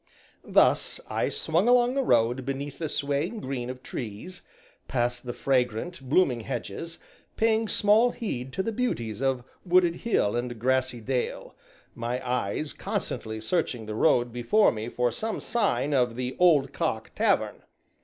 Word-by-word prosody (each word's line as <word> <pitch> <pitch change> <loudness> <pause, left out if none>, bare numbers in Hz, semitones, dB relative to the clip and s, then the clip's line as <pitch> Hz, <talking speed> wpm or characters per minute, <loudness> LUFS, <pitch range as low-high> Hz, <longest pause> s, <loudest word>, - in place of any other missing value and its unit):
Thus, - - +3
I - - 0
swung 170 +7 +1
along 245 0 +5
the 275 - +1
road 120 - +2
beneath 140 +2 -4
the 160 -2 -2
swaying 145 +10 -1
green 130 -5 -4
of 130 0 -7
trees, 120 - -7 0.5
past 120 0 -1
the - - -1
fragrant, 130 +5 -1
blooming 140 -6 +3
hedges, 125 +7 -5 0.4
paying 225 0 +2
small 210 +4 +4
heed 135 - -4
to 190 - -1
the 225 - -1
beauties 120 - -2
of 135 -2 0 0.2
wooded 175 -2 +3
hill 120 - +1
and 120 0 -3
grassy 130 0 0
dale, 125 +2 -3 0.4
my 120 +2 -3
eyes 125 +4 -1
constantly 110 0 -4
searching 120 -2 -1
the 105 - -5
road 120 +2 +2
before 125 - +3
me 110 +1 -5
for 125 0 0
some 220 - -3
sign 150 - 0
of 125 -4 +2
the 125 +1 -3
"Old 155 -7 +4
Cock" - - -2
tavern. - - +1
130 Hz, 150 wpm, -27 LUFS, 120-180 Hz, 0.5 s, along